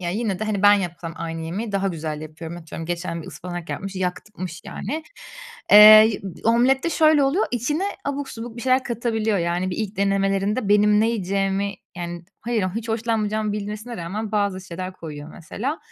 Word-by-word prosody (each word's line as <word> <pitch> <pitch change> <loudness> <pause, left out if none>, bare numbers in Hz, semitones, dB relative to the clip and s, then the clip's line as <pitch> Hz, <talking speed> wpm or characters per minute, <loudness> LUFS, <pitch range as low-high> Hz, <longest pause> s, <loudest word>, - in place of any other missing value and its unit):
ya 175 -1 -2
yine 210 -2 -1
de 220 - -2
hani 205 -2 -2
ben 205 0 +8
yapsam 175 -3 -3
aynı 165 0 -5
yemeği 200 +7 -4
daha 195 0 +1
güzel 155 -3 -4
yapıyorum. 160 +2 -8
Atıyorum, 165 -1 -8
geçen 170 -1 -3
bir - - -12
ıspanak 175 -1 -7
yapmış, 195 -1 -5
yakmış 185 -1 -4
yani. 315 +3 -5 0.7
Eee, 215 +1 +9 0.2
omlette 255 +7 +3
şöyle 310 -2 +4
oluyor, 315 +10 +2
içine 295 - -1 0.2
abuk 280 -1 -3
subuk 230 0 -8
bir 235 - -6
şeyler 260 0 +2
katabiliyor. 225 -3 -1
Yani, 175 +2 -1
bir - - -4
ilk 215 -2 -3
denemelerinde 195 +2 +1
benim 210 0 +5
ne 225 - +3
yiyeceğimi 195 -1 -1 0.2
Yani, 175 0 -6 0.2
hayır, 225 -4 -1
hiç 230 0 -4
hoşlanmayacağımı 220 -2 -1
bilmesine 210 +3 -5
rağmen 205 +6 -4
bazı 200 -2 0
şeyler 185 0 -6
koyuyor 150 -3 -9
mesela. 240 - -4
200 Hz, 170 wpm, -23 LUFS, 175-225 Hz, 0.7 s, Eee